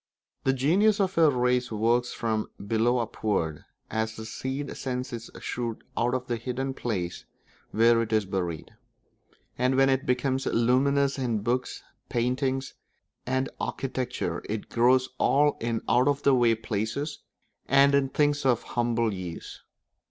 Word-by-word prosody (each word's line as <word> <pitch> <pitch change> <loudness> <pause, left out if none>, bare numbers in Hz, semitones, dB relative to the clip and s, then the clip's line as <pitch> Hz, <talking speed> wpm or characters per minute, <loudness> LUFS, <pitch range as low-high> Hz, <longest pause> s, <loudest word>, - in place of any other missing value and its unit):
The 135 - +4
genius 190 +11 +3
of 190 -1 +1
a 160 -2 +7
race 125 -2 +1
works 120 +3 +1
from 110 -2 -2 0.2
below 115 +4 +2
upward, 105 -9 -2 0.3
as 110 0 -1
the 110 - -7
seed 130 +5 -4
sends 125 0 -4
its 115 0 -6
shoot 120 -2 -3 0.2
out 120 +2 +1
of 125 0 -3
the 120 -2 -2
hidden 130 +3 -3
place 95 -9 -3 0.4
where 115 +1 +4
it 115 - -3
is 110 -2 +2
buried; 90 -4 -3 0.9
and 125 +1 +2
when 135 0 +4
it 135 0 0
becomes 130 +1 0
luminous 135 +4 +2
in 115 -5 -1
books, 125 +2 -2 0.3
painting, 130 +2 0 0.6
and 130 +1 0
architecture, 130 -2 -3
it 105 0 -4
grows 125 +2 +3
also 145 +1 +3
in 115 -1 -2
out 125 +2 +3
of 145 0 +1
the 140 - +5
way 120 -3 +4
places 115 +7 -3 0.5
and 140 0 +5
in 140 -1 +3
things 145 +1 +1
of 125 -3 +2
humble 115 -2 0
use. 90 -3 -7
125 Hz, 145 wpm, -27 LUFS, 115-135 Hz, 0.9 s, a